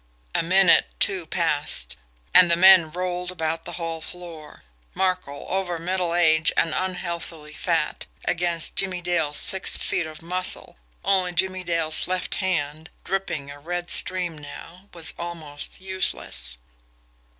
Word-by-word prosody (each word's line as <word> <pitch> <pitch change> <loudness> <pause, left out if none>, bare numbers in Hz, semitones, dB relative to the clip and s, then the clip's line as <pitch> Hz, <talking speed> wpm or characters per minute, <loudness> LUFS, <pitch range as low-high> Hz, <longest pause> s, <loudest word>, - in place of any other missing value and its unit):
A - - +2
minute, 185 +1 +5
two 185 -5 +2
passed 150 - -1 0.4
and 180 -1 +7
the 170 - +4
men 185 -2 +7
rolled 180 +1 -4
about 165 -2 -3
the 175 - -7
hall 165 -2 -5
floor. 165 -3 -10 0.3
Markel, 185 -7 -2
over 185 -2 -2
middle 175 0 -2
age 160 -2 +4
and 165 -2 +2
unheathily 170 -4 -4
fat, - - -2 0.2
against 175 -2 +1
Jimmie 185 -2 0
Dale's 165 -4 -1
six 190 - +5
feet 170 - -1
of 155 0 -11
muscle 180 - 0 0.3
only 185 -2 +1
Jimmie 185 +1 0
Dale's 165 -2 0
left 185 0 -2
hand, 160 -4 -2
dripping 160 -8 -3
a 145 - -11
red 175 +3 -3
stream 180 -4 +2
now, 170 +6 -12
was 165 -2 -1
almost 160 -4 -6
useless. 190 - -2
175 Hz, 135 wpm, -23 LUFS, 160-185 Hz, 0.4 s, and